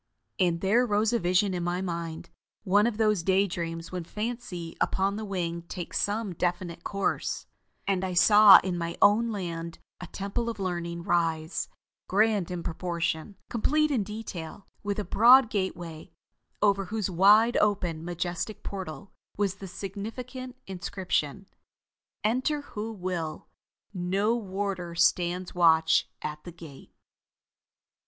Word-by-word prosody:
And 175 -3 +2
there 215 +6 +3
rose 215 -1 +1
a 235 - +2
vision 185 +2 +2
in 175 -1 -2
my 175 +1 -1
mind 170 -2 -5 0.3
one 205 +2 +4
of 230 -3 -2
those 215 -4 +2
day 190 +3 +3
dreams 165 -2 -5
when 180 -2 -4
fancy 210 -4 -5
upon 195 +1 +1
the 220 - -4
wing 175 -4 -3
takes 175 -3 -4
some 205 -1 -1
definite 175 0 -2
course 195 -1 -2 0.4
and 190 -2 +1
I 185 -1 -2
saw 205 +2 +9
in 180 -2 -2
my 170 0 -4
own 220 +3 +4
land 170 -4 -5 0.2
a 180 - -7
Temple 200 +6 -3
of 225 - -6
Learning 170 -2 -3
rise, 165 -2 0 0.4
grand 205 -2 +2
in 175 -2 -4
proportion, 170 +2 -3
complete 305 +6 +1
in 255 -6 +2
detail, 200 -4 -7 0.2
with 205 -1 -2
a 210 - -1
broad 235 +5 +6
gateway, 175 -4 -4 0.5
over 200 -1 +3
whose 210 -1 -2
wide 210 +6 +5
open 180 -6 +1
majestic 175 +4 -4
portal 190 0 -7 0.2
was 200 -1 0
the 195 - -8
significant 230 +7 -7
inscription: 185 -2 -2 0.8
"ENTER 255 +7 +1
WHO 220 -5 -6
WILL: 180 -5 -4 0.5
NO 195 +5 +1
WARDER 190 -5 -3
STANDS 175 +1 +1
WATCH 165 -2 +4
AT 150 0 -5
THE 175 - -8
GATE." 160 -5 -13
190 Hz, 135 wpm, -28 LUFS, 170-210 Hz, 0.8 s, saw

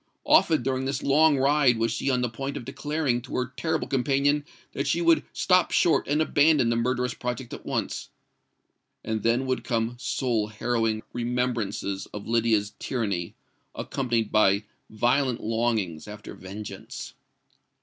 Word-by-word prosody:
Often 155 -6 +4
during 130 +1 -1
this 135 0 -2
long 150 +1 +4
ride 135 -2 +4
was 115 0 +1
she 130 - -1
on 125 -2 +2
the 125 - +1
point 135 +4 -5
of 120 - -7
declaring 145 -4 -1
to - - -8
her 125 0 -2
terrible 160 +3 -1
companion 140 +2 +2 0.3
that 140 +1 -2
she 165 - +1
would 165 -1 +4
stop 185 -1 +3
short 170 - +3
and 150 +2 +2
abandon 145 -5 +4
the - - +1
murderous 125 +1 0
project 125 0 -5
at - - -9
once: - - -3 1.0
and 110 -1 -2
then 115 +4 +2
would 130 -1 -1
come 115 0 -1
soul 120 -5 0
harrowing 110 0 -1
remembrances 120 -5 -2
of 105 - -7
Lydia's 110 -3 +1
tyranny, 100 -9 -2 0.4
accompanied 120 -5 -1
by 100 -1 +4 0.3
violent 120 +3 +1
longings 110 -8 -1
after 105 0 -9
vengeance. 100 +3 -8
120 Hz, 150 wpm, -26 LUFS, 110-135 Hz, 1.0 s, Often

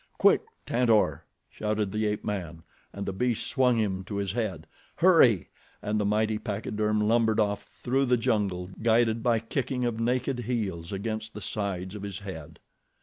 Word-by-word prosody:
"Quick, - - +5 0.2
Tantor!" 110 - +2 0.2
shouted 105 -2 -2
the 110 +1 0
ape 105 0 -2
man, 85 -5 -4 0.3
and 100 0 -5
the 95 - -3
beast 120 +3 0
swung 125 -3 +2
him 95 -4 0
to 100 - -5
his 100 -2 -1
head. 110 -4 -3 0.3
"Hurry!" 155 - +5 0.3
and 105 +1 -1
the - - 0
mighty 105 +1 +1
pachyderm 105 0 -1
lumbered 110 -1 +3
off 105 -1 0
through 135 +3 -1
the 125 -1 +3
jungle, 100 -6 0
guided 115 0 +3
by 120 -1 +3
kicking 125 +2 -2
of 115 -2 -1
naked 125 +2 0
heels 105 -9 -3
against 110 +2 -4
the - - -5
sides 95 -3 -3
of 105 - -7
his 100 -2 -5
head. 80 -6 -8
110 Hz, 165 wpm, -28 LUFS, 100-115 Hz, 0.3 s, Quick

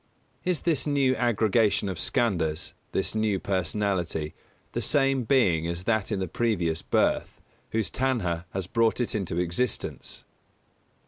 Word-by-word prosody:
_Is 180 -4 0
this 160 -4 +1
new 140 -3 +3
aggregation 110 -3 +2
of 95 -4 -3
Skandhas 85 -10 0 0.2
this - - 0
new 110 -2 +1
personality 95 -4 -1 0.4
the - - -2
same 135 -3 +2
being 95 - +3
as 85 +1 -3
that 110 0 0
in 105 - 0
the 95 - -2
previous 85 -6 0
birth, - - 0 0.3
whose 110 -2 -1
Tanhā 100 -11 0
has 95 -1 -3
brought 115 +5 +1
it 120 - -1
into 95 -5 -2
existence? 90 +7 -2
105 Hz, 135 wpm, -27 LUFS, 90-120 Hz, 0.4 s, new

